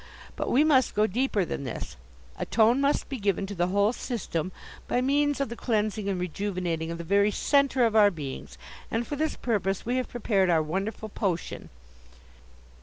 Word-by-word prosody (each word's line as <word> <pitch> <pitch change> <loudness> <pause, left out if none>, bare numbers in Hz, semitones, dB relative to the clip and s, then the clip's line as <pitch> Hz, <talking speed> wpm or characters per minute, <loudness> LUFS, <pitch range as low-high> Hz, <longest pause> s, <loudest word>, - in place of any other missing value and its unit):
But - - -3
we 275 +5 +4
must 270 -5 +3
go 210 +1 +4
deeper 220 -2 0
than 140 - -4
this; 125 - -6 0.4
a - - -4
tone 235 +4 +4
must 280 +1 +1
be 265 - -5
given 200 -1 0
to 200 - -6
the 175 -2 0
whole 200 +4 +2
system 190 - -3 0.4
by - - +1
means 285 +2 +2
of 275 - -1
the 235 - -5
cleansing 215 -3 -1
and 190 -2 -1
rejuvenating 180 -2 -2
of 170 - -4
the 170 - -6
very 200 +4 +3
centre 275 +2 +2
of 225 -1 0
our 210 -2 +7
beings, 150 -8 -7 0.3
and, 230 +1 -1
for 290 - -4
this 310 +2 -1
purpose, 200 -5 -1
we 245 +2 0
have 255 - -2
prepared 205 -6 +1
our 160 -2 +3
wonderful 195 +7 -3
potion." 190 -5 -3
210 Hz, 185 wpm, -27 LUFS, 185-245 Hz, 0.4 s, our